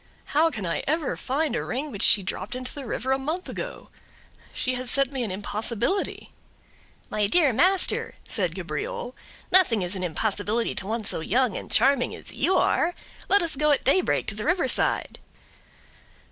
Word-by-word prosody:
"How 315 Hz, +3 st, +4 dB
can 220 Hz, -, -5 dB
I 170 Hz, -, -2 dB
ever 310 Hz, 0 st, 0 dB
find 275 Hz, 0 st, -1 dB
a -, -, -1 dB
ring 275 Hz, +4 st, -4 dB
which 205 Hz, -, -5 dB
she 200 Hz, -, +6 dB
dropped 190 Hz, +4 st, -4 dB
into 255 Hz, 0 st, -5 dB
the 280 Hz, -4 st, -7 dB
river 255 Hz, +4 st, -2 dB
a 265 Hz, -, +2 dB
month 315 Hz, +7 st, -3 dB
ago? -, -, -7 dB, 0.6 s
She 255 Hz, -, -2 dB
has 255 Hz, 0 st, -2 dB
set 275 Hz, +1 st, +3 dB
me 265 Hz, -3 st, -2 dB
an 225 Hz, -, -3 dB
impossibility." 220 Hz, -, -2 dB, 0.8 s
"My 210 Hz, -1 st, +1 dB
dear 295 Hz, -, +4 dB
master," 370 Hz, -, +2 dB
said -, -, -1 dB
Cabriole, 485 Hz, +2 st, -5 dB, 0.4 s
"nothing 255 Hz, -, +6 dB
is 180 Hz, +2 st, -4 dB
an 185 Hz, -, -4 dB
impossibility 205 Hz, +6 st, -1 dB
to 190 Hz, -, -4 dB
one 225 Hz, +1 st, -2 dB
so 200 Hz, -, -2 dB
young 240 Hz, +7 st, +1 dB
and -, -, -6 dB
charming 275 Hz, -2 st, +2 dB
as -, -, -9 dB
you 380 Hz, -, +1 dB
are; 345 Hz, +1 st, +2 dB, 0.3 s
let 400 Hz, -2 st, +4 dB
us 330 Hz, -3 st, -2 dB
go 300 Hz, +2 st, +2 dB
at 290 Hz, -, +2 dB
daybreak 365 Hz, +8 st, +2 dB
to -, -, -3 dB
the 210 Hz, +1 st, -6 dB
river 350 Hz, -2 st, +1 dB
side." -, -, 0 dB
260 Hz, 180 wpm, -25 LUFS, 215-315 Hz, 0.8 s, she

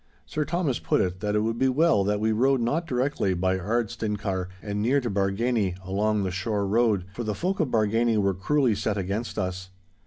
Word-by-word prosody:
Sir 150 Hz, 0 st, -2 dB
Thomas 160 Hz, -5 st, -1 dB
put -, -, +1 dB
it, 90 Hz, 0 st, -1 dB
that 105 Hz, +1 st, -1 dB
it 105 Hz, -, +3 dB
would 115 Hz, +1 st, -1 dB
be 130 Hz, -, +3 dB
well 145 Hz, -5 st, +3 dB
that 105 Hz, 0 st, +1 dB
we 110 Hz, +1 st, +1 dB
rode 130 Hz, +4 st, +3 dB
not 150 Hz, +8 st, 0 dB
directly 125 Hz, -7 st, 0 dB
by 95 Hz, +1 st, 0 dB
Ardstinchar 105 Hz, -2 st, -2 dB
and 105 Hz, +1 st, -3 dB
near 130 Hz, +6 st, +3 dB
to 120 Hz, -4 st, -3 dB
Bargany 100 Hz, 0 st, 0 dB
along 105 Hz, +2 st, 0 dB
the 95 Hz, -, -2 dB
shore 100 Hz, +2 st, -1 dB
road, 105 Hz, -2 st, +2 dB
for 120 Hz, -, -4 dB
the 105 Hz, -2 st, -2 dB
folk 190 Hz, +3 st, -2 dB
of 160 Hz, -, +2 dB
Bargany 115 Hz, 0 st, +2 dB
were 100 Hz, -2 st, +2 dB
cruelly 125 Hz, +6 st, +1 dB
set 105 Hz, +1 st, -1 dB
against 100 Hz, +5 st, -3 dB
us. 95 Hz, 0 st, -3 dB
110 Hz, 205 wpm, -26 LUFS, 100-125 Hz, -, it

